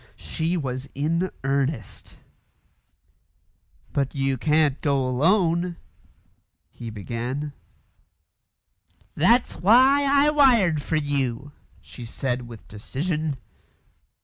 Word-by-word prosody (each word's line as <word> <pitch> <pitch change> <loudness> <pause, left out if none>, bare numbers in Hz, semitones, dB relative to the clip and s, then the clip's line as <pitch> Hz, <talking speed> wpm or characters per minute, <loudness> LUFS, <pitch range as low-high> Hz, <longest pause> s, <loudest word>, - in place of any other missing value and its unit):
She 165 +3 -3
was 130 -2 -4
in 165 +6 0
earnest. 135 -4 -3 1.8
"But 140 -1 -1
you 135 -1 0
can't 150 +1 +1
go 140 -3 +1
alone 170 +5 +1 0.5
" - - -40 0.3
he 115 - -8
began. 120 +7 -5 1.6
"That's 230 - +2
why 260 +8 +5
I 285 +1 +4
wired 235 - +4
for 160 - -2
you," 140 -3 -2 0.3
she 125 - -11
said 125 +1 -3
with 115 -3 -12
decision. 150 - -3
145 Hz, 95 wpm, -24 LUFS, 130-175 Hz, 1.8 s, why